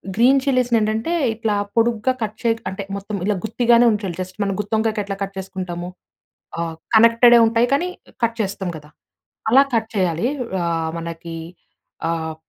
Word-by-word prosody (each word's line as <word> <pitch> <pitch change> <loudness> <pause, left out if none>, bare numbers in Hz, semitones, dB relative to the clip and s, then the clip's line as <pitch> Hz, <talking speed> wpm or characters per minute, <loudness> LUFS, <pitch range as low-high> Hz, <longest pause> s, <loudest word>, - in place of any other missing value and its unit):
Green 260 +4 +5
చిల్లీస్‌ని 250 -3 +2
ఏంటంటే 220 +8 -1 0.2
ఇట్లా 220 -1 -1 0.2
పొడుగ్గా 230 +1 +2
కట్ 215 0 -2
చే 235 - +1 0.2
అంటే 195 +1 -5
మొత్తం 200 +1 -5
ఇలా 210 0 +1
గుత్తిగానే 235 +1 +3
ఉంచాలి. 200 -5 -2
జస్ట్ 185 +1 -7
మనం 195 -1 -1
గుత్తొంకాయకి 220 0 -1
ఎట్లా 195 0 -4
కట్ 195 0 -6
చేసుకుంటాము 185 -2 -5 0.7
ఆ! - - 0 0.3
కనెక్టెడే 230 +1 +7
ఉంటాయి. 230 +2 +2
కానీ, 345 +6 +1 0.4
కట్ 230 0 +1
చేస్తాం 195 -2 -3
కదా! 150 0 -14 0.6
అలా 270 +4 +7
కట్ 225 -1 +1
చేయాలి. 180 +2 +1 0.4
ఆహ్, 165 -1 -1
మనకి 165 0 -6 0.7
ఆహ్, 160 -1 -3
215 Hz, 150 wpm, -21 LUFS, 185-230 Hz, 0.7 s, కనెక్టెడే